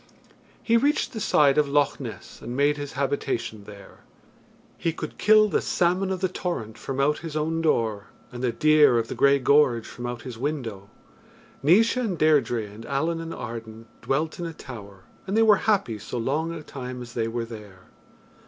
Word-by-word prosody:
He 230 Hz, 0 st, +4 dB
reached 285 Hz, +4 st, +1 dB
the 220 Hz, -, -4 dB
side 150 Hz, -8 st, +4 dB
of 145 Hz, -2 st, +2 dB
Loch 145 Hz, 0 st, +2 dB
Ness -, -, -9 dB
and 120 Hz, +2 st, -6 dB
made 145 Hz, +1 st, +3 dB
his 145 Hz, -1 st, -6 dB
habitation 135 Hz, -6 st, -2 dB
there. 100 Hz, -1 st, -13 dB, 0.8 s
He 165 Hz, -, -2 dB
could -, -, -7 dB
kill 215 Hz, 0 st, +6 dB
the -, -, 0 dB
salmon 180 Hz, +2 st, +1 dB
of 190 Hz, -1 st, -3 dB
the 190 Hz, -, +2 dB
torrent 170 Hz, -12 st, -4 dB
from 135 Hz, 0 st, -5 dB
out 150 Hz, +2 st, +2 dB
his 160 Hz, -2 st, -5 dB
own 160 Hz, +2 st, -1 dB
door, 110 Hz, -9 st, 0 dB, 0.2 s
and 125 Hz, -1 st, -7 dB
the 125 Hz, -, +2 dB
deer 155 Hz, -3 st, +5 dB
of 115 Hz, -1 st, -1 dB
the -, -, -3 dB
grey 140 Hz, 0 st, +4 dB
gorge 135 Hz, -4 st, +3 dB
from 120 Hz, 0 st, -7 dB
out 120 Hz, -2 st, -6 dB
his 125 Hz, -3 st, -8 dB
window. 120 Hz, -9 st, -4 dB, 0.7 s
Naois 205 Hz, -, +4 dB
and 220 Hz, -8 st, -1 dB
Deirdre 140 Hz, -7 st, +2 dB
and 105 Hz, +2 st, -11 dB
Allen 165 Hz, +4 st, -1 dB
and 165 Hz, 0 st, -6 dB
Arden 115 Hz, -3 st, -7 dB, 0.2 s
dwelt 155 Hz, +5 st, -1 dB
in 170 Hz, -, -3 dB
a 165 Hz, -, -7 dB
tower, 100 Hz, -9 st, -11 dB, 0.2 s
and 195 Hz, +3 st, 0 dB
they 225 Hz, -, +5 dB
were 210 Hz, -2 st, +6 dB
happy 125 Hz, -, +1 dB
so 115 Hz, -, -6 dB
long 145 Hz, +8 st, -1 dB
a 165 Hz, -2 st, -7 dB
time 125 Hz, -3 st, -7 dB
as 120 Hz, 0 st, -11 dB
they 115 Hz, -2 st, -1 dB
were 115 Hz, 0 st, -3 dB
there. 105 Hz, -5 st, -11 dB
140 Hz, 190 wpm, -25 LUFS, 115-165 Hz, 0.8 s, kill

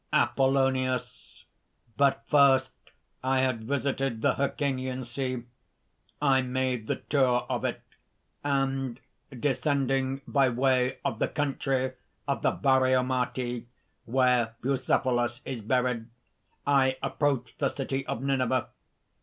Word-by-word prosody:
APOLLONIUS. 130 Hz, -2 st, +1 dB, 0.5 s
"But 140 Hz, -4 st, +2 dB
first 135 Hz, -2 st, +4 dB, 0.5 s
I 130 Hz, 0 st, +2 dB
had 125 Hz, -4 st, 0 dB
visited 135 Hz, -3 st, -1 dB
the -, -, +4 dB
Hyrcanian 130 Hz, -2 st, -2 dB
Sea; 125 Hz, 0 st, -3 dB, 0.8 s
I 135 Hz, -2 st, +4 dB
made 125 Hz, -3 st, -1 dB
the -, -, 0 dB
tour 130 Hz, -4 st, +2 dB
of -, -, -2 dB
it; -, -, -3 dB, 0.6 s
and 135 Hz, -3 st, -1 dB, 0.3 s
descending 135 Hz, 0 st, 0 dB
by 135 Hz, -2 st, +3 dB
way 130 Hz, +1 st, +1 dB
of 110 Hz, -4 st, -1 dB
the -, -, +2 dB
country 135 Hz, -3 st, -1 dB, 0.4 s
of 140 Hz, -, -1 dB
the -, -, +3 dB
Baraomati, 130 Hz, -2 st, +1 dB, 0.4 s
where 125 Hz, -2 st, +2 dB
Bucephalus 125 Hz, -2 st, +1 dB
is 130 Hz, -4 st, -4 dB
buried, 125 Hz, 0 st, 0 dB, 0.6 s
I 135 Hz, -2 st, +3 dB
approached 135 Hz, -2 st, -1 dB
the 140 Hz, -, +2 dB
city 135 Hz, 0 st, -3 dB
of 120 Hz, -, -3 dB
Nineveh. 130 Hz, -2 st, +1 dB
130 Hz, 110 wpm, -28 LUFS, 125-135 Hz, 0.8 s, first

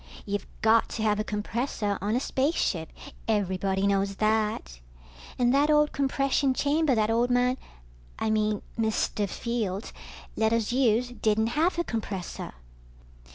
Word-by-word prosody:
You've 205 Hz, 0 st, -3 dB, 0.2 s
got 225 Hz, +1 st, +4 dB
to 220 Hz, -, -2 dB
have 210 Hz, -1 st, +2 dB
a -, -, +1 dB
compressor 210 Hz, 0 st, -2 dB
on 210 Hz, +3 st, 0 dB
a -, -, +2 dB
spaceship, 260 Hz, -, 0 dB, 0.4 s
everybody 195 Hz, -2 st, 0 dB
knows 195 Hz, 0 st, +1 dB
that. 215 Hz, -, 0 dB, 0.6 s
And 245 Hz, 0 st, +3 dB
that 285 Hz, +2 st, +3 dB
old 300 Hz, 0 st, +4 dB
compression 275 Hz, -1 st, +1 dB
chamber 290 Hz, -1 st, +2 dB
that 215 Hz, 0 st, +2 dB
old 235 Hz, +2 st, +2 dB
man... 250 Hz, +1 st, +2 dB, 0.6 s
I 220 Hz, -, 0 dB
mean 215 Hz, -1 st, 0 dB, 0.2 s
Mr. 215 Hz, -2 st, 0 dB
Fields 220 Hz, -4 st, -3 dB, 0.4 s
let 220 Hz, 0 st, +2 dB
us 230 Hz, -1 st, 0 dB
use 245 Hz, -1 st, +2 dB
didn't 220 Hz, -2 st, +1 dB
have 335 Hz, +4 st, +2 dB
a 345 Hz, -, +1 dB
compressor. 205 Hz, -, -5 dB
220 Hz, 140 wpm, -27 LUFS, 210-255 Hz, 0.6 s, got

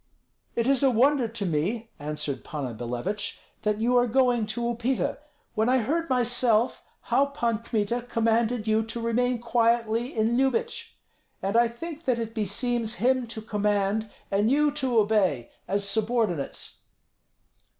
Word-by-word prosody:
"It 235 Hz, -, +1 dB
is 270 Hz, 0 st, +3 dB
a 275 Hz, -, +5 dB
wonder 255 Hz, +1 st, +3 dB
to 220 Hz, -2 st, -4 dB
me," 195 Hz, +8 st, -1 dB
answered 150 Hz, -2 st, -4 dB
Panna 140 Hz, -6 st, -4 dB
Billevich, 125 Hz, -, -3 dB, 0.2 s
"that 210 Hz, -1 st, 0 dB
you 240 Hz, +3 st, +2 dB
are 245 Hz, 0 st, +4 dB
going 245 Hz, -2 st, +2 dB
to 230 Hz, +3 st, -4 dB
Upita, 240 Hz, +2 st, -1 dB, 0.3 s
when 220 Hz, +1 st, +1 dB
I 260 Hz, -, +4 dB
heard 310 Hz, +8 st, -1 dB
myself 245 Hz, -2 st, +2 dB, 0.2 s
how 280 Hz, +1 st, +2 dB
Pan 235 Hz, -6 st, -1 dB
Kmita 230 Hz, 0 st, -1 dB
commanded 230 Hz, 0 st, +1 dB
you 220 Hz, 0 st, +3 dB
to 225 Hz, +1 st, -5 dB
remain 240 Hz, +1 st, +1 dB
quietly 235 Hz, 0 st, +1 dB
in 225 Hz, +1 st, +2 dB
Lyubich, 360 Hz, -, -1 dB, 0.5 s
and 195 Hz, +3 st, -1 dB
I 235 Hz, 0 st, +5 dB
think 315 Hz, +7 st, -8 dB
that 250 Hz, -3 st, +2 dB
it 225 Hz, -1 st, -4 dB
beseems 225 Hz, +2 st, -1 dB
him 250 Hz, +4 st, +1 dB
to 220 Hz, -1 st, -7 dB
command 210 Hz, 0 st, 0 dB, 0.2 s
and 205 Hz, +3 st, +2 dB
you 295 Hz, +2 st, +3 dB
to 265 Hz, -5 st, 0 dB
obey, 205 Hz, -, +2 dB, 0.2 s
as 200 Hz, +2 st, -1 dB
subordinates." 215 Hz, -, -1 dB
230 Hz, 150 wpm, -26 LUFS, 210-245 Hz, 0.5 s, a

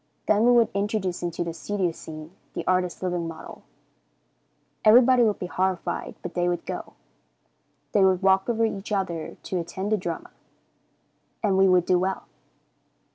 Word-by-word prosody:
Then 215 Hz, +2 st, +4 dB
we -, -, +6 dB
would 235 Hz, -2 st, +5 dB
introduce 200 Hz, -2 st, -1 dB
into 175 Hz, -1 st, -2 dB
the 170 Hz, -1 st, -4 dB
studio 190 Hz, 0 st, -2 dB
scene 155 Hz, -1 st, -10 dB, 0.2 s
the -, -, -4 dB
artist's 180 Hz, 0 st, 0 dB
living 175 Hz, -2 st, -1 dB
model. 165 Hz, -1 st, -9 dB, 1.2 s
Everybody 245 Hz, +3 st, +6 dB
would 215 Hz, -3 st, +3 dB
be -, -, -5 dB
horrified, 185 Hz, 0 st, -2 dB
but -, -, -6 dB
they 175 Hz, 0 st, +1 dB
would 175 Hz, -, -3 dB
go. -, -, -6 dB, 1.0 s
They 200 Hz, -, +4 dB
would 190 Hz, 0 st, +3 dB
walk 190 Hz, +3 st, +3 dB
over 230 Hz, -1 st, +2 dB
each 205 Hz, -1 st, -4 dB
other 180 Hz, -5 st, -2 dB
to 185 Hz, -, -2 dB
attend 190 Hz, +4 st, -4 dB
the 215 Hz, -, +3 dB
drama, 175 Hz, -4 st, -5 dB, 1.1 s
and 200 Hz, -3 st, +2 dB
we 190 Hz, 0 st, +5 dB
would 180 Hz, -1 st, +4 dB
do 180 Hz, -1 st, +3 dB
well. 190 Hz, +1 st, -2 dB
190 Hz, 160 wpm, -25 LUFS, 175-205 Hz, 1.2 s, we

